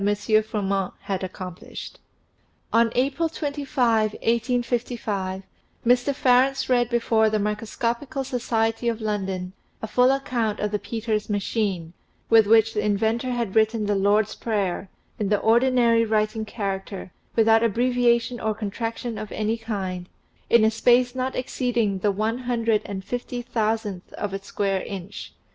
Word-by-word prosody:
Froment 195 -3 -1
had 195 -1 -3
accomplished. 185 -1 -8 0.7
On 230 0 +4
April 275 +6 +1
25, 270 -8 0
1855, 230 -5 -1 0.4
Mr. 245 +3 +3
Farrants 260 +1 +3
read 245 -2 +2
before 230 -2 +2
the 215 - +1
Microsco 215 +3 -1
pical 275 -1 -5
Society'of 230 -2 -1
London 190 -4 -3 0.3
a - - -4
full 250 +3 +3
account 240 -6 -1
of 210 - -1
the 210 - -1
Peters 215 +1 -3
machine, 200 -4 -1 0.4
with 225 -2 +7
which 225 0 +5
the 210 - -1
inventor 220 +4 0
had 235 -5 -2
written 220 0 +3
the 205 - +1
Lord's 205 +2 +2
Prayer 200 -4 -2 0.3
(in 205 -2 0
the 210 - +3
ordinary 235 +1 +4
writing 215 0 0
character, 195 -3 -5 0.2
without 225 0 +5
abbreviation 240 +1 +2
or 220 -1 -1
contraction 225 +2 -4
of 215 - -7
any 215 +1 -1
kind), 190 -5 -4 0.4
in 235 -2 +6
a 220 - +4
space 245 +2 +3
not 260 0 -2
exceeding 240 -6 -1
the 205 - +1
one 215 +4 -1
hundred 230 -3 +1
and 190 -1 -6
fifty 245 0 -4
thousandth 220 -5 -2
of 205 -2 -4
a 195 - -4
square 195 -1 -1
inch. 195 0 -7
225 Hz, 140 wpm, -24 LUFS, 205-240 Hz, 0.7 s, with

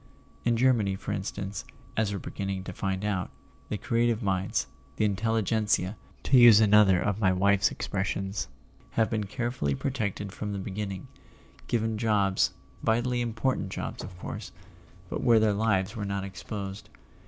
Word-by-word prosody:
In 115 -1 +3
Germany, 115 -6 +3
for 95 - -5
instance, 100 0 -4 0.3
as 110 -2 +1
we're 100 - -2
beginning 95 0 -4
to 95 - -6
find 95 +2 -2
out, 100 -3 -1 0.4
the 105 - -1
creative 115 0 +1
minds, 95 -1 0 0.3
the 105 - +2
Intel¬ 110 +2 0
ligentsia 105 -2 +1 0.3
(to 130 - +5
use 120 -3 +9
another 105 -3 +6
of 105 +2 -1
my 95 -4 +4
wife's 100 +2 +3
expressions), 95 0 -2 0.5
have 110 -1 +2
been 110 -2 0
carefully 120 - -2
protected 105 - -2
from 105 +1 -4
the - - -3
beginning, 95 -1 -5 0.6
given 110 -2 0
jobs, 100 -4 +2 0.3
vitally 120 +2 +1
important 115 -2 -1
jobs 95 - -5
of 90 -1 -9
course, - - -6 0.6
but - - -4
where 115 -2 +5
their 110 -1 +3
lives 105 -1 +1
were 105 - -3
not 100 -1 -2
exposed. 95 +2 -6
105 Hz, 155 wpm, -28 LUFS, 95-110 Hz, 0.6 s, use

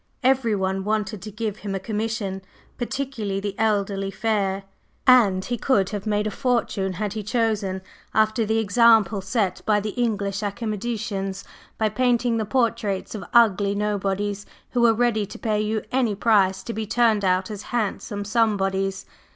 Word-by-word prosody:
Everyone 210 -8 +1
wanted 210 -1 -1
to 215 - -7
give 215 0 -4
him 200 -2 -4
a - - -2
commission, 210 -1 -3 0.3
particularly 240 -6 -3
the 200 0 -3
elderly 200 -3 0
fair, 195 -1 -1 0.4
and 210 -8 +5
he 240 -2 -3
could 200 -8 +2
have 205 -1 -4
made 210 0 +1
a 215 - -1
fortune 215 -6 0
had 205 +2 -3
he 215 - -3
chosen, 210 -3 -1 0.3
after 220 +1 +2
the 220 +1 0
example 225 -1 +4
set 190 -1 -1
him - - -21
by 210 -1 +4
the 210 +1 -3
English 200 -4 -1
academicians, 210 -2 -3 0.3
by 220 - +2
painting 240 +1 +1
the 220 - -1
portraits 230 -4 0
of 215 - -5
ugly 205 -4 +4
nobodies 205 0 -1 0.2
who 245 - +1
were 235 -1 +6
ready 225 -3 +1
to - - -9
pay 215 -1 0
any 245 -5 +1
price 195 -3 +3
to 230 - -5
be 220 -1 -4
turned 220 -2 +2
out 185 +1 +1
as 205 -2 -6
handsome 205 -3 -3
somebodies. 195 -3 0
210 Hz, 160 wpm, -24 LUFS, 195-230 Hz, 0.4 s, were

